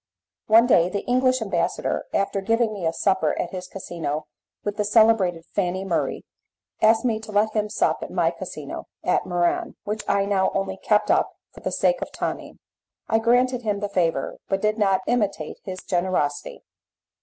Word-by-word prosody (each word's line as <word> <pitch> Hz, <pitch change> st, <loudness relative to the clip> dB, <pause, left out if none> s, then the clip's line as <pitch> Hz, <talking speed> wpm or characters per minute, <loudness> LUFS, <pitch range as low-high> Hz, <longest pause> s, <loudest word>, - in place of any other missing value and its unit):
One 225 Hz, +2 st, +7 dB
day 175 Hz, -8 st, +4 dB
the 200 Hz, +2 st, -4 dB
English 255 Hz, 0 st, +2 dB
ambassador, 175 Hz, -5 st, -1 dB
after 195 Hz, 0 st, 0 dB
giving 225 Hz, +2 st, +1 dB
me 185 Hz, -5 st, -2 dB
a -, -, +2 dB
supper 190 Hz, +2 st, +1 dB
at 175 Hz, -, -2 dB
his 185 Hz, -1 st, -6 dB
casino 165 Hz, -5 st, -4 dB, 0.4 s
with 205 Hz, -1 st, -3 dB
the 210 Hz, -, +1 dB
celebrated 205 Hz, -6 st, +3 dB
Fanny 190 Hz, -1 st, -1 dB
Murray, 175 Hz, -3 st, -1 dB, 0.6 s
asked 220 Hz, +3 st, +4 dB
me 225 Hz, -3 st, +1 dB
to 220 Hz, -1 st, -10 dB
let 210 Hz, +1 st, +2 dB
him 210 Hz, -1 st, -1 dB
sup 210 Hz, -, +1 dB
at -, -, -5 dB
my -, -, +1 dB
casino -, -, -7 dB, 0.2 s
at -, -, +1 dB
Muran, 175 Hz, -1 st, 0 dB
which 210 Hz, +1 st, -3 dB
I 200 Hz, 0 st, +2 dB
now 195 Hz, -1 st, +2 dB
only 195 Hz, -1 st, -1 dB
kept 210 Hz, +1 st, +2 dB
up -, -, +2 dB, 0.2 s
for -, -, -13 dB
the -, -, -3 dB
sake -, -, +1 dB
of -, -, -5 dB
Tonine. -, -, -4 dB, 0.5 s
I 225 Hz, -, +3 dB
granted 245 Hz, +2 st, +2 dB
him 210 Hz, -3 st, -1 dB
the 205 Hz, 0 st, -3 dB
favour, 165 Hz, -8 st, 0 dB
but 195 Hz, -, +1 dB
did 215 Hz, +1 st, +1 dB
not 195 Hz, -2 st, +3 dB
imitate 205 Hz, -10 st, -1 dB
his 185 Hz, -1 st, -6 dB
generosity. 175 Hz, -6 st, -1 dB
200 Hz, 180 wpm, -24 LUFS, 185-220 Hz, 0.6 s, One